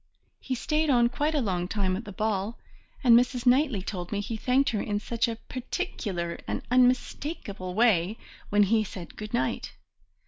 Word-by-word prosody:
He 260 - -3
stayed 305 +5 0
on 240 -3 +4
quite 295 +5 -1
a 290 - +2
long 180 -5 -1
time 190 -2 0
at 220 +5 -5
the 205 - -7
ball, 210 +2 -1 0.5
and 240 -3 +7
Mrs. 245 +1 +2
Knightley 250 -5 +3
told 180 -3 -5
me 205 - -1
he 215 +3 -3
thanked 255 +5 +2
her 210 -3 -1
in 205 -1 -1
such 235 +3 0
a 230 - -2
particular 220 - -4
and - - -3
unmistakable 250 - 0
way 215 -3 +3 0.3
when 205 0 +4
he 215 +2 +3
said 180 -4 -9
good 215 0 -7
night! 240 - -1
225 Hz, 175 wpm, -27 LUFS, 200-250 Hz, 0.5 s, and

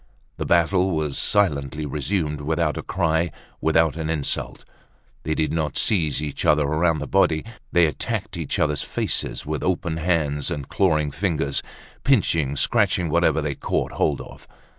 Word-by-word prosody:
The - - -3
battle 90 +2 +3
was 80 -5 -1
silently 75 -7 +1
resumed, 75 +1 -2
without 80 +1 0
a - - -3
cry, 85 -2 0 0.3
without 80 -1 +3
an 80 -1 -3
insult. 75 -4 -3 0.6
They 80 - -2
did 80 - 0
not 80 -4 -1
seize 80 -8 +2
each 75 -2 -4
other 75 -1 +4
round 80 +2 +1
the 75 - -4
body, 85 -4 +2 0.3
they 85 -1 +5
attacked 75 -4 -3
each - - -3
other's 75 -2 +1
faces - - -2
with 75 -1 -3
open 85 -3 -1
hands 80 -4 0
and 70 -2 -4
clawing 75 -6 +1
fingers, 80 -6 -1 0.4
pinching, 80 - +2
scratching 85 +3 +2
whatever 80 -2 +2
they 75 -1 -1
caught - - -2
hold - - 0
of. - - -12
80 Hz, 155 wpm, -23 LUFS, 75-85 Hz, 0.6 s, they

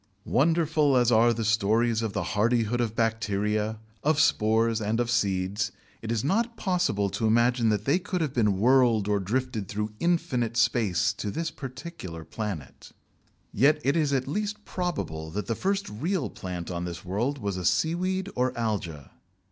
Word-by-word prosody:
Wonderful 155 -2 +2
as 120 -1 +3
are 115 +1 +5
the 115 -1 -2
stories 110 +2 +2
of 110 -3 -2
the - - -1
hardihood 115 +2 +1
of 115 -2 -2
bacteria, 110 -1 0 0.3
of 155 0 +2
spores, 115 -3 +2
and 110 +2 0
of 120 -1 0
seeds, 100 -2 0 0.3
it 115 - -4
is 115 -2 0
not 230 - 0
possible 180 - 0
to 105 +3 0
imagine 120 +1 +3
that 105 -1 0
they 155 +7 +3
could 180 0 -3
have 155 -5 -1
been 105 -6 +2
whirled 120 -3 +4
or 105 -1 +2
drifted 115 +1 -2
through 105 +2 -3
infinite 140 -10 0
space 110 -4 +2
to 105 0 -4
this 165 +9 -3
particular 130 - -8
planet. 80 - -6 0.6
Yet 145 +7 +4
it 140 +4 +2
is 155 -4 +2
at 135 -2 0
least 210 +6 -3
probable 115 - -3
that 105 +6 -4
the 115 - -1
first 195 - -1
real 160 - -2
plant 90 -2 -6
on 85 0 -3
this 85 +1 -7
world 120 +10 -1
was 100 -6 -3
a 90 - -4
seaweed 185 - 0
or 125 0 0
alga. 90 - -3
115 Hz, 170 wpm, -27 LUFS, 105-145 Hz, 0.6 s, are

